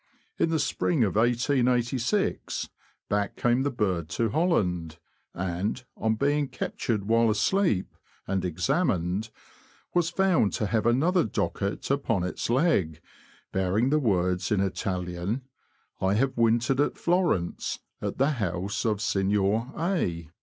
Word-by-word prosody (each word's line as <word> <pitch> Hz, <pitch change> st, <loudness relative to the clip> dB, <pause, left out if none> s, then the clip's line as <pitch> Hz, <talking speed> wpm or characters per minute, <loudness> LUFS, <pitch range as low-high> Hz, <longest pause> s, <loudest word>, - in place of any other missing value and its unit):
In -, -, +3 dB
the 160 Hz, -, +1 dB
spring 150 Hz, -1 st, +1 dB
of 100 Hz, -, 0 dB
1886, 125 Hz, -, +1 dB, 0.4 s
back 105 Hz, -1 st, -1 dB
came 120 Hz, +1 st, +2 dB
the 140 Hz, -, +1 dB
bird 95 Hz, -, -1 dB
to 115 Hz, +6 st, 0 dB
Holland, 90 Hz, -, 0 dB, 0.4 s
and, 95 Hz, +7 st, -2 dB
on 110 Hz, 0 st, 0 dB
being 145 Hz, +4 st, +1 dB
captured 110 Hz, -5 st, -2 dB
while 115 Hz, +2 st, +3 dB
asleep, 110 Hz, -, +1 dB, 0.3 s
and 95 Hz, -1 st, -1 dB
examined, 95 Hz, -, 0 dB, 0.6 s
was 175 Hz, -2 st, +2 dB
found 185 Hz, -, +2 dB
to 105 Hz, -, -1 dB
have 110 Hz, +2 st, +1 dB
another 165 Hz, +10 st, +3 dB
docket 100 Hz, +3 st, -2 dB
upon 115 Hz, -9 st, 0 dB
its 90 Hz, -, -3 dB
leg, 120 Hz, -, +2 dB, 0.5 s
bearing 95 Hz, +7 st, +1 dB
the 155 Hz, -, +4 dB
words, 90 Hz, -7 st, 0 dB
in 105 Hz, -, +3 dB
Italian: 95 Hz, +3 st, -2 dB, 0.3 s
" -, -, -40 dB
I 95 Hz, +1 st, +2 dB
have 130 Hz, +4 st, +1 dB
wintered 120 Hz, +3 st, +2 dB
at 145 Hz, -, 0 dB
Florence, 170 Hz, -, 0 dB, 0.2 s
at -, -, -3 dB
the 135 Hz, +3 st, +3 dB
house 100 Hz, -, -2 dB
of 105 Hz, -2 st, 0 dB
Signor 100 Hz, +5 st, +1 dB
A 90 Hz, -, -1 dB
110 Hz, 130 wpm, -27 LUFS, 95-135 Hz, 0.6 s, the